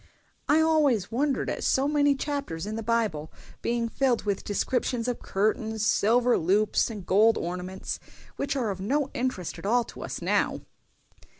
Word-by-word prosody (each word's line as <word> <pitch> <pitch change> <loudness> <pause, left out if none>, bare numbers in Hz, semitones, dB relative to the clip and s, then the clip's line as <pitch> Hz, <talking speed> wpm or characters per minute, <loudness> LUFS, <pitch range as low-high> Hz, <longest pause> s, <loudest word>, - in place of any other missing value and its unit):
"I 305 +2 +5
always 290 - +2
wondered 275 +4 0
at - - -3
so 270 +1 +2
many 290 -1 +3
chapters 270 - -3
in 215 +1 -4
the 225 - -3
Bible 215 -9 -1 0.3
being 235 0 0
filled 250 0 +1
with 200 -2 -2
descriptions 245 +3 -1
of 245 - -2
curtains, 215 +2 -1
silver 240 +4 +3
loops, 200 +8 +2
and 210 -5 -7
gold 215 +5 +4
ornaments, 180 +2 -4 0.4
which 280 0 -2
are 240 -6 0
of 190 -1 -6
no 275 +7 0
interest 240 -9 -3
at - - -9
all 240 +3 +3
to - - -11
us - - -5
now." - - 0
230 Hz, 165 wpm, -27 LUFS, 200-265 Hz, 0.4 s, I